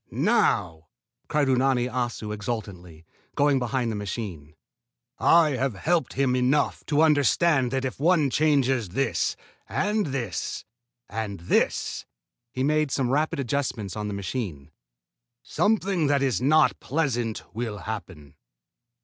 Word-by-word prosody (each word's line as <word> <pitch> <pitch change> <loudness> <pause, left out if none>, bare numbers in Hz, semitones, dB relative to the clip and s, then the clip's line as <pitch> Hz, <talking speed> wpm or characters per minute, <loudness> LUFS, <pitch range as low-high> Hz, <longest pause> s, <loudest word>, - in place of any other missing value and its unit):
"Now!" 80 -2 +1 0.4
cried 150 -2 +1
Unani 130 -1 +2
Assu 120 -4 -3
exultingly, 95 -7 -6 0.3
going 140 -1 +3
behind 125 -1 -1
the - - -3
machine. 95 -8 -6 0.6
"I 165 -2 +5
have 130 -3 -1
helped 160 - 0
him 130 -1 +1
enough 130 +4 +1
to 150 +1 +3
understand 145 -2 +3
that 135 0 -2
if 130 - -4
one 155 -3 +3
changes 135 - +2
this 135 +7 0 0.3
and 210 -1 0
this 120 - -4 0.4
and 100 -4 -5
this" 85 - 0 0.4
he 130 - -2
made 155 +1 +2
some 130 -2 0
rapid 150 +1 0
adjustments 125 -6 -2
on 105 -1 -3
the 105 - -4
machine 95 - -5 0.7
"something 200 -6 +1
that 140 -1 +2
is 130 -3 0
not 155 +4 +3
pleasant 120 -7 -1
will 110 -2 -4
happen." 95 -10 -7
130 Hz, 125 wpm, -25 LUFS, 105-145 Hz, 0.7 s, I